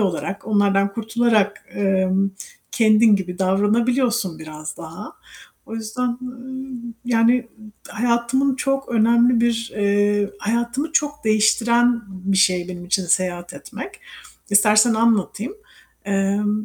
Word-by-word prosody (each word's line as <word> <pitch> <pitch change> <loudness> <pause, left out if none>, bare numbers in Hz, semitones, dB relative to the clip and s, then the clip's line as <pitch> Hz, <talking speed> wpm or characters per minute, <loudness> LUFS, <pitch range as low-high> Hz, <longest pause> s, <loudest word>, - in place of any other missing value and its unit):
olarak, 195 0 -2
onlardan 200 -2 +2
kurtularak, 220 -2 0
emm 195 0 +1 0.4
kendin 215 -1 +5
gibi 180 -2 -6
davranabiliyorsun 215 +1 +1
biraz 155 -1 -8
daha. 165 +6 -9 0.5
O 225 - -8
yüzden, 235 +2 -3
ııı, 260 +1 -8 0.4
yani 240 +1 +2 0.4
hayatımın 240 +4 0
çok 270 0 -1
önemli 235 +1 +3
bir, 230 -1 0
eee, 205 0 +1
hayatımı 235 +8 -2
çok 295 -1 -1
değiştiren 235 +2 +3
bir 190 0 -3
şey 185 -2 +2
benim 175 -1 -7
için 185 +1 0
seyahat 175 0 -1
etmek. - - -9 0.5
İstersen 215 +3 +5
anlatayım. 225 - 0 0.5
Emm, 205 +2 0
215 Hz, 110 wpm, -21 LUFS, 195-235 Hz, 0.5 s, kendin